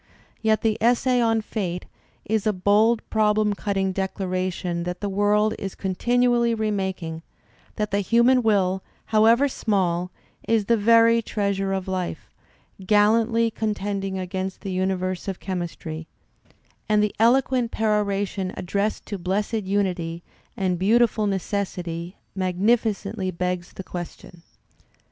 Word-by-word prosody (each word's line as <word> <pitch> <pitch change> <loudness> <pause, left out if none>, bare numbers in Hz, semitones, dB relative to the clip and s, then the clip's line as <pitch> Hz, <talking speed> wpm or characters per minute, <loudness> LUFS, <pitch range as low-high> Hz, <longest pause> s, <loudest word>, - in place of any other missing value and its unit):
Yet 220 -1 +2
the 220 -2 +1
essay 245 +2 +3
on 225 -1 +2
"Fate" 180 -5 -4 0.4
is 220 0 0
a 215 - +3
bold 210 +5 +2
problem 210 -1 +2
cutting 195 -1 -1
declaration 185 -2 -2
that 180 +1 -4
the 205 - -2
world 205 +2 +2
is 195 -1 -5
continuously 235 +4 +1
remaking, 190 -6 -2 0.5
that 210 -1 -2
the 200 - +1
human 235 +5 +4
will, 190 -4 +2 0.2
however 225 +5 +4
small, 185 -8 0 0.4
is 225 -2 +2
the 235 - +3
very 230 +1 +5
treasure 200 -3 -1
of 190 -1 -2
life, 185 -2 -4 0.5
"gallantly 225 +3 +3
contending 200 -3 -2
against 190 +1 -4
the 195 - -5
universe 185 0 -1
of 195 -2 -3
chemistry"; 165 -3 -5 0.8
and 210 0 +4
the 210 - 0
eloquent 250 +1 +3
perora 210 -2 +1
tion 190 -1 -4
addressed 200 +4 -2
to 205 -2 -5
Blessed 205 +4 -1
Unity 180 -4 -1 0.3
and 185 -2 0
Beautiful 220 +1 +3
Necessity 180 -3 -3 0.2
magnificently 200 +1 0
begs 180 0 -3
the 190 - -7
question. 175 -1 -8
200 Hz, 125 wpm, -24 LUFS, 185-220 Hz, 0.8 s, very